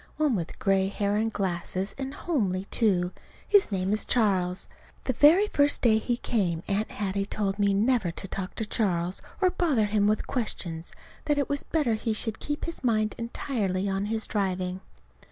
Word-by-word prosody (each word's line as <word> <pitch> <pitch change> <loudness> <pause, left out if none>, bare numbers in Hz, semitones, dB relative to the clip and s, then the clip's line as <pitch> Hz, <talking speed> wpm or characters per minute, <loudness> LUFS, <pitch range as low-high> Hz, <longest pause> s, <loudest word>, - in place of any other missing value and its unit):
One 300 -6 +2
with 170 -4 -4
gray 195 -1 +2
hair 200 +1 -1
and 220 +1 +1
glasses, 185 0 -2
and 270 0 -5
homely, 195 - -1
too. 185 -6 +2 0.4
His 405 - +4
name 190 +1 0
is 215 - +2
Charles. 190 -6 +1 0.4
The 260 - -1
very 320 - +6
first 285 -8 +3
day 220 -3 +5
he 240 +2 -1
came, 180 -10 -1
Aunt 205 +2 0
Hattie 200 -1 -2
told 200 -1 -2
me 200 -1 +3
never 220 -2 +2
to 175 +3 -5
talk 190 0 -5
to 220 - -2
Charles, 185 -5 -1 0.2
or 370 -1 +4
bother 290 - +2
him 205 0 +2
with 215 0 +1
questions; 175 -9 -3 0.3
that 295 -1 +1
it 285 - 0
was 285 0 0
better 295 -8 0
he 220 +1 -1
should 220 0 -3
keep 295 0 -3
his 335 -4 -6
mind 215 -4 +1
entirely 210 -5 -2
on 195 0 -1
his 220 +1 -2
driving. 185 -2 -2
210 Hz, 180 wpm, -27 LUFS, 190-245 Hz, 0.4 s, very